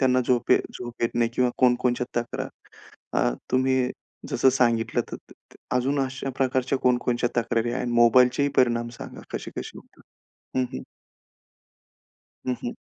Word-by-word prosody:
त्यांना 130 -1 +4
झोप 120 -1 +1
येत - - +6 0.2
झोप 120 -1 -7
येत 115 - +2
नाही 115 -1 +2
किंवा 125 -1 +2
कोणकोणच्या 125 -1 +2
तक्रार. 120 - -5 0.7
अ, - - +3 0.2
तुम्ही 130 -1 +2 0.4
जसं 130 - +4
सांगितलं 120 -3 +2
त - - -2 0.2
त - - -11 0.2
त - - -17 0.2
अजून 135 +3 +1
अशा 135 0 -3
प्रकारच्या 130 0 +1
कोण-कोणच्या 120 -1 +1
तक्रारी 115 0 0
आहेत? 125 0 -2
मोबाईलचे 125 +3 +5
ही 145 - +3
परिणाम 120 -2 +3
सांगा, - - -8
कसे-कसे - - -6
होतात? - - -19 0.6
हं, 130 - +2
हं. 65 - -5 1.6
हं, 125 - +1
हं. 120 - -3
125 Hz, 150 wpm, -25 LUFS, 120-130 Hz, 1.6 s, येत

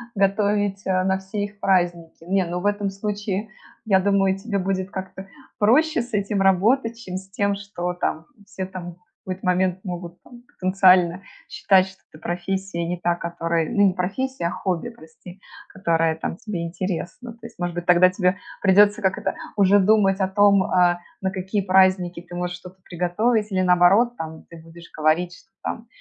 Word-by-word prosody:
готовить, 200 0 +1
э, 185 -1 +1
на 190 0 +1
все 195 +2 -4
их 205 0 -13
праздники. 175 -3 0
Не, 190 +1 +1
ну 175 +1 -3
в 180 - -7
этом 205 -1 0
случае, 205 +1 -4 0.4
я 195 -3 +4
думаю, 195 -1 +2
тебе 200 0 -3
будет 190 0 -2
как-то 190 0 -7 0.3
проще 295 +9 +3
с 240 0 -10
этим 200 -1 0
работать, 225 +5 +2
чем 185 -6 -7
с 190 0 -10
тем, 200 0 0
что, 200 -3 -5
там, 160 -2 -3 0.2
все, 195 -2 -6
там, 175 -2 -8 0.3
в - - -11
какой-то 185 +1 -5
момент 180 0 +1
могут, 175 -2 -7
там, 240 -1 -15
потенциально 185 -1 +3 0.3
считать, 190 -1 +3
что 190 - -15
это 155 - -16
профессия 180 0 -3
не 180 +1 -3
та, 175 0 0
которая 170 -1 -2
ну 205 0 +3
не 185 - +1
профессия, 195 +5 -3
а - - -3
хобби, 185 +3 -2
прости,- 180 -3 -14 0.3
которая, 165 -4 +1
там, 160 +1 -5
тебе 210 -8 -5
интересна. 185 +6 -5
То 230 - -22
есть, 230 - -12
может 175 -1 -3
быть, 175 0 -4
тогда 180 +1 +6
тебя, 185 +1 0 0.2
придется, 205 +3 +5
как 190 -2 +1
это, - - -3 0.2
уже 200 0 +5
думать 195 -1 +3
о 190 - +1
том, 200 0 +4
э, 180 -1 +3 0.2
на 190 -1 -1
какие 190 +2 -2
праздники 185 -2 +3
ты 175 0 -11
можешь 180 0 -3
что-то 180 +1 -14
приготовить, 210 +6 0
или, 185 -1 +1
наоборот, 185 +7 +4
там, 160 0 -7
ты 165 -1 -12
будешь 165 +1 -14
говорить, 160 +3 +1
что, 225 - -23
там, 230 0 -5
190 Hz, 180 wpm, -23 LUFS, 175-200 Hz, 0.4 s, тогда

